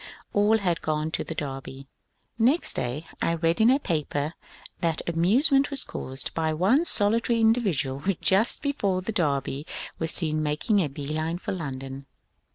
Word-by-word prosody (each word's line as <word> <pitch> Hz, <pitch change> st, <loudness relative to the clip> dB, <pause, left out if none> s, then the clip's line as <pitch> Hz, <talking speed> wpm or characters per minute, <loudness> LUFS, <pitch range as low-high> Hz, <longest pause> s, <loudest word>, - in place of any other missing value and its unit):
All 205 Hz, +2 st, +4 dB
had 175 Hz, -5 st, -1 dB
gone 155 Hz, 0 st, -1 dB
to -, -, -1 dB
the 165 Hz, -, -6 dB
Derby. 135 Hz, -2 st, -6 dB, 0.5 s
Next 260 Hz, +9 st, +3 dB
day 130 Hz, +6 st, -2 dB, 0.2 s
I 165 Hz, -, +1 dB
read 165 Hz, +3 st, +1 dB
in 225 Hz, -, +6 dB
a 265 Hz, -, +5 dB
paper 155 Hz, -, -2 dB, 0.5 s
that 165 Hz, -2 st, -1 dB
amusement 250 Hz, -, +3 dB
was 280 Hz, -1 st, +2 dB
caused 130 Hz, +1 st, -3 dB
by 160 Hz, -1 st, -1 dB
one 225 Hz, -, +3 dB
solitary 230 Hz, -1 st, +3 dB
indi 225 Hz, +2 st, +4 dB
vidual 140 Hz, -, -1 dB
who 195 Hz, +5 st, 0 dB
just 195 Hz, +7 st, +2 dB
before 200 Hz, -11 st, -1 dB
the 225 Hz, -, -3 dB
Derby 145 Hz, -7 st, -1 dB, 0.4 s
was 165 Hz, -, -1 dB
seen 155 Hz, -2 st, 0 dB
making 150 Hz, +8 st, +1 dB
a 170 Hz, -, +1 dB
bee 140 Hz, +1 st, -7 dB
line 155 Hz, +2 st, -2 dB
for -, -, -5 dB
London. 135 Hz, -5 st, -6 dB
165 Hz, 165 wpm, -26 LUFS, 150-215 Hz, 0.5 s, in